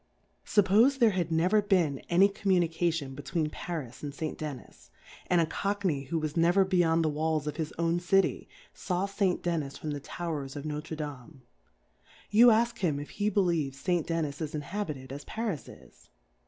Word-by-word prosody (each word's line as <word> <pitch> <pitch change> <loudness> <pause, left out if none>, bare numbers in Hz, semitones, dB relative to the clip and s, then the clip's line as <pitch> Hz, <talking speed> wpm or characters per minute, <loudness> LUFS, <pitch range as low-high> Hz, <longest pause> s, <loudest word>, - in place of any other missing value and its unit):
Suppofe 215 +7 +4
there 235 -4 +5
had 175 -3 -2
never 180 +6 +3
been 175 -9 +1
any 180 +3 +6
Communication 170 -7 0
between 150 +3 -2
Pc - - -9 0.2
rh 120 +1 -14
and 145 -1 -5
St. 155 +1 -3
Dennis^ 145 -5 -8 0.4
and 175 - +3
a 165 - +4
Cockney 185 -4 -1
who 165 +5 -2
was 155 -1 -3
ne 165 0 +4
ver 190 +2 +4
beyond 165 -3 +2
the 155 - +1
W^alls 155 0 -1
of 150 - -4
his 160 -2 -3
own 170 +1 +1
City, 195 +2 +1 0.2
faw 180 +1 -2
St. 195 -2 0
Dermis 160 -5 -2
from 155 - -5
the 145 - -3
Towers 145 -2 -5
of 145 - -5
Noftre 150 +1 -5
Dr^me; 145 -1 -7 0.9
you 235 +4 +8
ask 235 +1 +2
him 155 -7 0
if 145 - -8
he 205 +1 0
be 210 -1 +2
lieves 155 -7 0
St. 175 -2 0
Dennis 160 -3 -2
is 155 0 -3
Inhabited 150 -5 -5
as 145 +1 -7
Far 225 -1 -3
is 155 - -7
is - - -17
165 Hz, 185 wpm, -29 LUFS, 150-190 Hz, 0.9 s, you